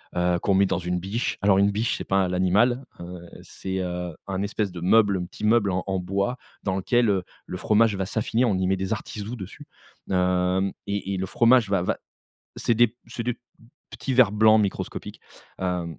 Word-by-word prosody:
heu, 90 0 +1
qu'on 100 - +1
met 100 +1 +5
dans 95 - -1
une 90 0 -2
biche. 100 +7 -2
Alors 100 -1 +4
une 100 +1 +4
biche, 110 +3 -1
c'est - - -5
pas 95 -1 +1
l'animal, 100 +8 +2 0.2
heu, 90 +1 -8 0.2
c'est, 95 0 -5
heu, 90 -1 -4
un 95 -1 -2
espèce 100 -1 -2
de 90 -1 -8
meuble, 100 +2 +4
un 90 - -3
petit 100 +4 -7
meuble 105 -2 +3
en 90 0 -1
en 95 -1 0
bois 100 +7 -1 0.3
dans 95 -2 -1
lequel, 115 +4 +2
heu, 95 -3 +1 0.2
le 90 - -6
fromage 105 +2 +3
va 95 0 -2
s'affiner, 110 +4 0
on 110 -6 +2
y 95 0 0
met 95 - +2
des 95 +2 -3
artisous 110 +1 -4
dessus, 95 -3 -9 0.5
hem, 90 +1 +1
et 100 -1 -2
et - - -2
le 95 - -2
fromage 120 +1 +4
va 100 -3 +2
va - - -1 0.6
c'est 120 - +1
des 120 +2 +5
p 110 - -20
c'est 115 0 -5
des 120 0 -3 0.5
petits 135 - -3
verres 125 -5 +5
blancs 110 +1 +5
microscopiques, 100 -2 -4 0.4
heu, 90 -2 -1
100 Hz, 205 wpm, -25 LUFS, 90-110 Hz, 0.6 s, met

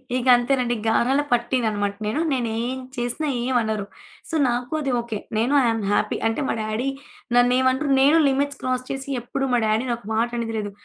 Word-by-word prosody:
ఇగ 255 0 -1
అంతేనండి 245 -1 0
గారాల 255 +5 +3
పట్టీననమాట 220 -5 0
నేను. 220 +9 -1
నేనేం 240 +1 -2 0.2
చేసినా 245 +6 -2 0.2
ఏమనరు. 220 -5 0 0.4
సో, 325 - -3
నాకు 245 +4 -2
అది 275 -3 -1
ఓకే. 230 -3 -5 0.2
నేను, 240 +6 +1
ఐయామ్ 225 -2 +1
హ్యాపీ. 210 - +1
అంటే, 225 +6 -1
మా - - +1
డ్యాడీ 215 +5 -2 0.5
నన్నేమనరు, 260 +3 +3
నేనూ 295 +4 +5
లిమిట్స్ 280 +1 -1
క్రాస్ 255 0 -1
చేసి 270 +1 -5
ఎప్పుడు 270 +3 -3
మా 245 - +4
డ్యాడీని 225 +3 +1
ఒక 235 - -19
మాటనేది 230 0 -1
లేదు. 205 -1 -4
245 Hz, 160 wpm, -23 LUFS, 225-260 Hz, 0.5 s, నేనూ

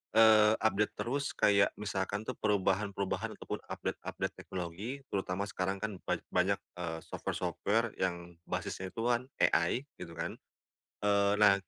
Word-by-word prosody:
eee, 110 -1 +8
update 105 -1 +1
terus 140 +4 -1
kayak 100 -1 +5
misalkan 100 0 -2
tuh 130 - -2
perubahan-perubahan 100 -1 0
atau - - -10
pun - - -3
update-update - - -3
teknologi 95 +10 -5
terutama 95 0 -1
sekarang 95 -1 -2
kan 105 -1 -4
ban - - +2 0.2
banyak, - - +3 0.2
eee, 85 -2 -3
software-software 115 +2 -1
yang 85 -2 -1
basisnya 95 0 -3
itu 115 - -5
kan 120 +1 +2 0.2
AI 130 - +2 0.2
gitu 85 -2 -7
kan. - - -2 0.7
Eee, 100 0 +4
nah, 105 -2 +8
100 Hz, 140 wpm, -33 LUFS, 95-110 Hz, 0.7 s, eee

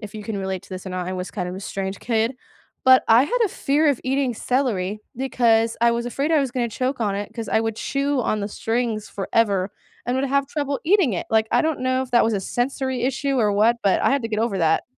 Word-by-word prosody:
if 210 -1 -9
you 210 - -6
can 220 -1 -4
relate 190 -1 -3
to - - -17
this 185 -1 -7
or 185 - -5
not, 180 -1 -3
I 185 - -3
was 180 0 -5
kind 180 -3 -4
of 180 - -5
a 190 - -7
strange 195 0 -4
kid, 230 +1 0 0.5
but 260 0 +7
I 230 +3 +7
had - - -1
a - - +1
fear 295 -1 +1
of 280 -4 +2
eating 265 -1 0
celery 215 -6 -1 0.2
because 230 -3 +2
I 235 0 +5
was 235 0 -1
afraid 280 +6 -2
I 315 - +4
was 270 -3 -1
gonna 240 -2 -1
choke 255 +3 -2
on 205 -3 0
it, 205 +2 -5
'cause 230 -1 -5
I 220 - +2
would 225 -1 -2
chew 280 0 -1
on 215 -3 -1
the 200 - -3
strings 225 0 -2
forever 200 -1 0 0.4
and 245 +1 0
would 265 - 0
have 275 +1 +1
trouble 285 -1 -3
eating 345 - +3
it, - - -4
like 220 0 +3
I - - +3
don't 315 -2 -1
know 255 0 +1
if 260 - -8
that 240 - +5
was 225 0 +1
a 195 - -1
sensory 260 +3 -2
issue 270 +1 0
or 210 -3 +2
what, 220 +4 +3
but 195 -2 +3
I - - +3
had 275 +1 +2
to 230 - -3
get 215 -1 -2
over 215 -5 0
that. 160 -1 +2
235 Hz, 265 wpm, -22 LUFS, 205-265 Hz, 0.5 s, but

